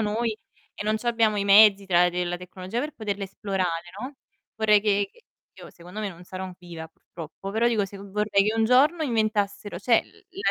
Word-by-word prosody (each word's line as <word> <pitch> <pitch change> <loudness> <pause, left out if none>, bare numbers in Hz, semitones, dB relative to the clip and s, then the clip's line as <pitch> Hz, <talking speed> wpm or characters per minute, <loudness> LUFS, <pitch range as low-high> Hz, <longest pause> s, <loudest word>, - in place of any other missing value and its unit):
noi 220 +1 -1 0.4
e - - -5
non 215 +1 0
c'abbiamo 225 -2 +1
i 200 - 0
mezzi, 200 0 +6
tra 180 -1 +4
de 180 0 -2
la 175 0 -3
tecnologia 185 +5 -6
per 300 +2 -4
poterla 205 -4 -4
esplorare, 185 -3 -3
no, 265 +4 -6 0.4
vorrei 210 -1 +4
che 205 -1 +1
che 470 - -23 0.4
io - - -11
secondo 180 +5 -10
me, 210 - -2
non 175 -1 -12
sarò 185 +1 -6
viva, 170 -3 -9
purtroppo, 165 +4 -10
però 230 +3 +2
dico 220 -4 +1
se 200 +1 -10
vorrei 200 +1 0
che 215 +2 0
un 225 - +3
giorno 290 +8 +4
inventassero 210 -5 -1
cioè, 230 +3 +3
la 395 -1 -5
205 Hz, 195 wpm, -25 LUFS, 185-225 Hz, 0.4 s, mezzi